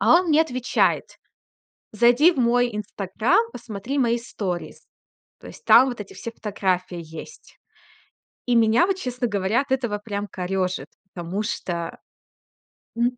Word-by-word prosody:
А 225 +11 +6
он 360 -1 +1
мне 310 +1 +5
отвечает: 255 -6 +1 0.9
"Зайди 240 - +5
в 275 - -8
мой 245 0 +3
Инстаграм, 210 - 0
посмотри 235 +4 -5
мои 235 -2 +2
сторис". 195 -7 -5 0.6
То - - -11
есть - - -13
там 265 - +7
вот 245 -3 -5
эти 200 - -8
все 230 - -7
фотографии 185 -5 -2
есть. 165 - -11 0.9
И 245 - +3
меня, 230 - +4
вот 390 - 0
честно 250 -7 -2
говоря, 205 +3 +1
от 275 - -9
этого 240 -6 0
прям 205 -1 -4
корёжит, 185 0 -2 0.3
потому 180 +4 -4
что, 175 -6 -4 1.0
м 245 +1 +1
230 Hz, 140 wpm, -23 LUFS, 195-250 Hz, 1.0 s, там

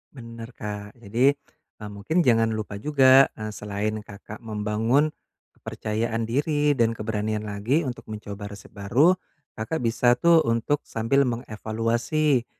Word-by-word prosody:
Benar 115 -2 -9
Kak, 105 -1 -6
jadi, 120 +5 +2 0.4
e 105 - -12
mungkin 155 - 0
jangan 115 -3 +3
lupa 105 -2 -5
juga, 135 +1 +6
e 110 0 -5
selain 105 +1 -3
Kakak 105 +1 -11
membangun 115 +6 0 0.5
kepercayaan 115 +1 -3
diri 145 +5 +1
dan 115 -1 +3
keberanian 110 0 -2
lagi 105 +10 0
untuk 125 -4 -6
mencoba 105 -1 -7
resep - - -15
baru, 125 - +3 0.4
Kakak 125 +7 -3
bisa 120 +1 +3
tuh 170 +5 +5
untuk 115 +5 +1
sambil 135 +5 +1
mengevaluasi 120 +4 0
115 Hz, 130 wpm, -25 LUFS, 105-130 Hz, 0.5 s, juga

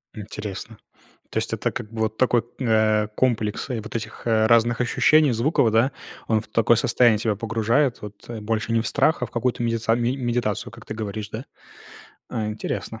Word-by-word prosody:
М, 110 - -6
интересно. 105 +1 -7 0.5
То - - -4
есть, - - -1
это - - -1
как 105 - -6
бы 115 -1 -4
вот 110 0 -1
такой, 120 -2 +3 0.2
э, 110 -3 +2
комплекс 115 -2 0
и - - -1
вот 110 +2 -9
этих 110 -1 -5
разных 115 +1 +3
ощущений 150 +4 +4
звуков, 115 0 +2
да? 115 +5 +3 0.4
Он 110 -1 +2
в - - -16
такое 115 0 +3
состояние 115 -1 +4
тебя 110 0 0
погружает 115 +5 0
вот, 105 +1 -11
больше 110 +1 -2
не 115 0 +3
в - - -3
страх, 160 - +2
а - - +1
в - - -14
какую-то 120 0 -1
медица 115 -1 +1
ме 120 +2 0
медитацию, 120 -5 -2
как - - -13
ты - - -6
говоришь, 105 -1 -5
да? 115 +5 -6 0.8
А, 110 - -2
интересно, 105 +1 -4
115 Hz, 190 wpm, -23 LUFS, 110-120 Hz, 0.8 s, ощущений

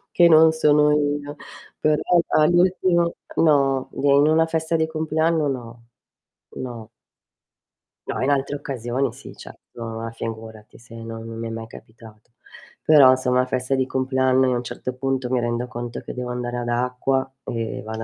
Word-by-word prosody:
che 175 -1 +6
non 160 0 +6
sono 150 -1 +3
io. 145 0 -1 0.5
Però 155 0 +2 0.4
all'ultimo 175 +1 +2 0.2
No, 135 -4 +2
d - - -7
in 140 +1 +5
una 160 +1 +4
festa 160 0 -1
di 160 0 0
compleanno 160 0 0
no. 120 -3 -7 0.7
No. 120 -4 -7 1.2
No - - -3
in 130 - +1
altre 140 0 0
occasioni, 130 -2 -3
sì, 135 +3 -12
certo. - - -12 0.4
Ah, 115 0 -5
figurati, 110 -1 -8
se 115 0 -16
non 115 0 -8
non 115 0 -8
mi 115 - -4
è - - -5
mai 115 0 -6
capitato. 110 0 -15 0.5
Però, 140 -4 +7
se 130 0 -3
è - - +1
una 125 0 +3
festa 130 +1 -1
di 130 0 +1
compleanno, 130 0 +1
io 130 - +1
a - - 0
un 120 - -4
certo 125 +1 -6
punto 130 0 -2
mi 130 0 +1
rendo 120 +1 -2
conto 120 -1 -6
che - - -8
devo 125 0 -5
andare 125 0 -4
ad 120 0 -4
acqua, 125 +2 -1
e 115 -2 -4
vado 110 +1 -6
130 Hz, 175 wpm, -22 LUFS, 120-150 Hz, 1.2 s, Però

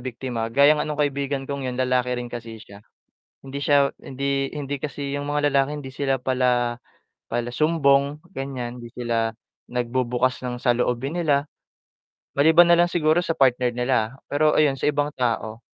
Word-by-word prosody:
biktima 120 -2 -4
gaya 140 +5 +5
nga 150 0 -1
no'ng 150 - -3
kaibigan 140 -1 -1
kong 140 -1 -4
'yon 125 - -4
lalaki 125 -1 +1
rin 120 0 -6
kasi 115 -1 -7
siya 100 -2 -14 0.6
hindi 135 +1 -6
siya 140 -1 +3
hindi 135 +1 -2
hindi 145 -1 -4
kasi 140 -1 -4
'yon 145 0 -3
mga 145 -1 +1
lalaki 140 +2 +1
hindi 130 - -8
sila 135 0 0
pala 125 -2 0 0.5
pala 120 +1 -2
sumbong 140 -2 +2 0.2
ganyan, 125 -3 -5
hindi 115 - -10
sila 115 -2 -1 0.4
nagbubukas 125 +1 -1
ng 125 -1 -4
saloobin 125 +4 0
nila, 150 -4 +1 0.9
maliban 165 +4 +6
na 170 - +5
lang 175 - +5
siguro 160 -1 +2
sa 170 -2 -1
partner 125 -2 +2
nila, 125 -1 0 0.2
pero 150 +1 +3
ayon 140 -3 +3
sa - - 0
ibang 145 0 +1
tao, 115 -3 -2
135 Hz, 165 wpm, -23 LUFS, 125-145 Hz, 0.9 s, maliban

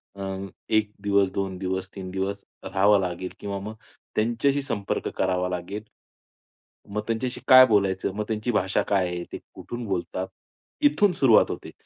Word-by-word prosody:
अं, 95 0 -4 0.2
1 110 -1 +2
दिवस, 100 -1 +3
2 95 -1 -2
दिवस, 95 0 -2
3 95 -1 -6
दिवस 95 +1 -3 0.2
राहावं 100 +1 +4
लागेल 90 0 -3
किंवा 100 -1 -4
मग 105 +3 -6 0.4
त्यांच्याशी 120 +6 +1
संपर्क 100 -7 -2
करावा 90 -1 +1
लागेल. 90 +4 -4 1.1
मग 105 +1 -2
त्यांच्याशी 120 +2 -2
काय 130 -1 +10
बोलायचं? 100 -3 +2
मग 105 - -1
त्यांची 110 +2 -1
भाषा 95 -3 +1
काय 95 -3 +3
आहे? 90 0 -4
ते - - -5 0.2
कुठून 120 0 -6
बोलतात? 95 0 -2 0.6
इथून 195 +7 +3
सुरुवात 130 -8 +5
होते. - - -7
100 Hz, 150 wpm, -25 LUFS, 95-110 Hz, 1.1 s, काय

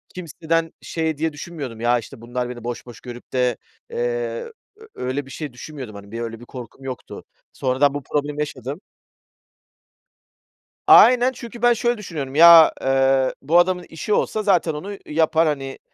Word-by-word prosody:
kimseden, 165 -1 -2
şey 160 -2 -2
diye 160 0 -1
düşünmüyordum 145 -7 -7
"Ya, 120 0 +3
işte, 115 0 -12
bunlar 125 +1 -4
beni 120 -2 -8
boş 120 0 -5
boş 120 - -12
görüp 120 -1 -11
de" 125 -2 +1 0.3
eee, - - -6 0.8
ö 440 +1 -16
öyle 130 +3 -3
bir 135 - -13
şey 150 -5 -6
düşünmüyordum 130 -5 -9
hani. 100 0 -12
Bir 115 +1 -5
öyle 115 -1 -5
bir 120 - -12
korkum 125 +1 -11
yoktu. 130 -2 -7 0.3
Sonradan 135 +2 +1
bu 145 -1 -5
problemi 150 0 -2
yaşadım. 145 - -5 2.1
Aynen 250 +1 +7
çünkü 235 -2 -10
ben 240 0 +5
şöyle 240 +1 0
düşünüyorum 150 -9 -6
ya, 165 0 +9
eee, 135 0 +2
bu 165 +6 +4
adamın 180 0 +1
işi 185 +6 -3
olsa 215 - 0
zaten 180 -5 +2
onu 195 +7 -6
yapar, 160 +1 +2
hani, 135 -3 -3
145 Hz, 160 wpm, -22 LUFS, 125-170 Hz, 2.1 s, ya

